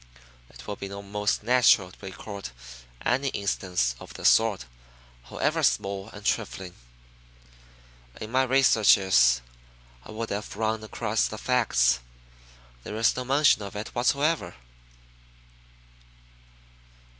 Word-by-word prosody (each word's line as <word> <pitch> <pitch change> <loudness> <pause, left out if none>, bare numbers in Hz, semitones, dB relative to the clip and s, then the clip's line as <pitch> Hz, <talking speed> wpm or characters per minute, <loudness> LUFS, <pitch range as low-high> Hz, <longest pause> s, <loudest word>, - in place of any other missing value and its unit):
"It - - -14
would 105 - -6
be 100 - -6
most 100 +1 -2
natural 115 -6 +4
to 95 - -14
record 100 -1 -8 0.6
any 130 +3 +1
instance 90 - -1
of - - -12
the - - -8
sort, 110 - +3 0.6
however - - -1
small 95 - 0
and 105 -1 -12
trifling. 95 -5 -2 1.5
In 110 - -7
my 130 +1 +3
researches 100 - +4 0.6
I - - -15
would 110 +1 -5
have 100 0 -5
run 110 0 -1
across 110 0 -1
the 110 - -7
facts. 65 - +2 0.8
There 105 - -7
is 115 +1 +2
no 125 - -3
mention 140 -3 +3
of 100 0 -8
it 105 +1 -5
whatever." 140 - 0
105 Hz, 115 wpm, -26 LUFS, 95-115 Hz, 1.5 s, natural